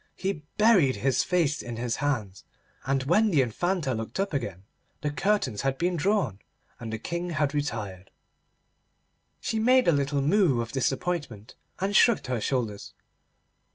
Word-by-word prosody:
He 190 -5 -3 0.2
buried 200 - +5
his 130 -2 +1
face 170 -5 +1
in 120 -1 -6
his 115 0 -2
hands, 110 -10 -2 0.4
and 135 -1 +1
when 210 +10 +3
the 150 -8 +4
Infanta 155 - -1
looked 115 +9 -5
up 195 -3 -1
again 100 -9 -3 0.4
the 150 - -1
curtains 175 - 0
had 135 0 -1
been 175 +3 0
drawn, 180 - 0 0.4
and 115 -2 -6
the 110 - -2
King 170 +9 -4
had 150 -3 0
retired. 105 -10 -4 1.3
She 220 - -1
made 255 +3 +4
a - - +6
little 140 -1 0
moue 160 - +3
of 115 -1 -3
disappointment, 135 - -2 0.3
and 200 +2 -1
shrugged 235 -4 +5
her 125 -3 -2
shoulders. 115 -6 -3
140 Hz, 155 wpm, -27 LUFS, 120-180 Hz, 1.3 s, a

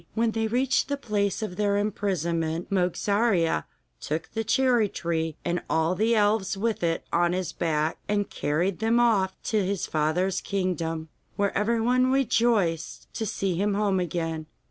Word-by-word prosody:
When 230 0 +2
they 225 0 -1
reached 250 +4 +1
the 285 - -1
place 210 -5 -1
of 180 -4 -5
their 205 -1 +2
imprisonment, 170 -5 -1
Mogarzea 195 0 +1 0.3
took 155 - -4
the 225 - -2
cherry 240 -2 +3
tree 165 -3 -2
and 175 0 0
all 160 +2 +2
the 220 +5 +2
elves 205 -2 +2
with 225 +2 -1
it 165 -1 0
on 175 +1 +3
his 185 -2 -2
back, 155 -2 -1
and 205 -1 +1
carried 165 +6 -1
them 225 +2 +2
off 210 -6 +3
to 215 -3 +1
his 195 0 -1
father's 170 +5 0
kingdom, 165 -5 -2 0.3
where 200 -1 0
everyone 235 +4 +2
rejoiced 225 - +1
to 220 - -3
see 195 -2 -1
him 200 +4 0
home 200 -2 +1
again. 165 -2 -3
195 Hz, 155 wpm, -26 LUFS, 170-220 Hz, 0.3 s, cherry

